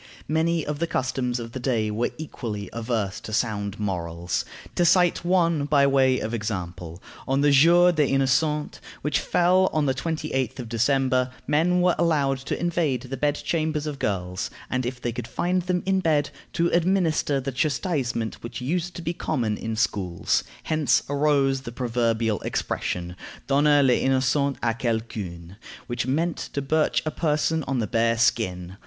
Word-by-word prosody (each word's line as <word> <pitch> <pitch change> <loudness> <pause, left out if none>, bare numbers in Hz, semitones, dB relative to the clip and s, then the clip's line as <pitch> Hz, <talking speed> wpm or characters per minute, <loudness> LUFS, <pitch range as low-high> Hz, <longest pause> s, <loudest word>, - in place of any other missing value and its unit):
Many 160 +1 +1
of 150 -1 -3
the 170 - 0
customs 130 -3 -1
of 115 -1 -7
the 130 - -5
day 115 -4 0
were 115 +3 0
equally 110 -10 -6
adverse 110 -4 -2
to - - -9
sound 105 -3 -1
morals. 85 -4 -2 0.3
To 175 - +1
cite 175 0 +4
one 170 -4 +2
by 145 -1 +4
way 135 -2 +3
of 110 - -4
example: 90 -5 -5 0.2
On 135 +1 +1
the 145 0 +4
Jour 170 +5 +6
des 155 -4 +2
Innocents, 135 +3 +1 0.2
which 150 -1 +1
fell 185 +2 +3
on 155 -1 +1
the 135 - +2
28th 135 -3 -2
of 125 -3 -6
December, 130 +2 +2 0.2
men 165 +5 +2
were 180 -1 +4
allowed 145 -5 +2
to 135 - -4
invade 160 -7 0
the 130 +1 -5
bed 145 +1 +1
chambers 155 -2 -1
of 145 -2 -5
girls, 90 -4 -2 0.2
and, 130 -1 0
if 125 0 -5
they 120 - -2
could 120 +1 -6
find 180 +1 0
them 180 0 -1
in 190 0 +2
bed, 150 -5 +1 0.2
to 170 0 +2
administer 170 -5 +2
the 135 +1 -3
chastisement 135 - -1
which 115 - -6
used 170 +7 -2
to 170 - -7
be 170 +1 -1
common 115 -9 -1
in 110 +1 -4
schools. 95 -6 0 0.2
Hence 155 -2 +2
arose 140 -2 +2
the 120 - -7
proverbial 115 -3 0
expression, 90 0 -3 0.3
Donner 145 +1 +4
les 125 -2 +3
innocents 135 +1 +1
à 115 -1 +2
quelqu'un, 100 -7 -4 0.3
which 120 0 -3
meant 160 +5 0 0.2
to 140 - -1
birch 155 +3 +1
a 155 - -1
person 160 0 0
on 135 - 0
the 115 - 0
bare 115 +2 +1
skin. 95 -5 0
135 Hz, 170 wpm, -25 LUFS, 115-155 Hz, 0.3 s, Jour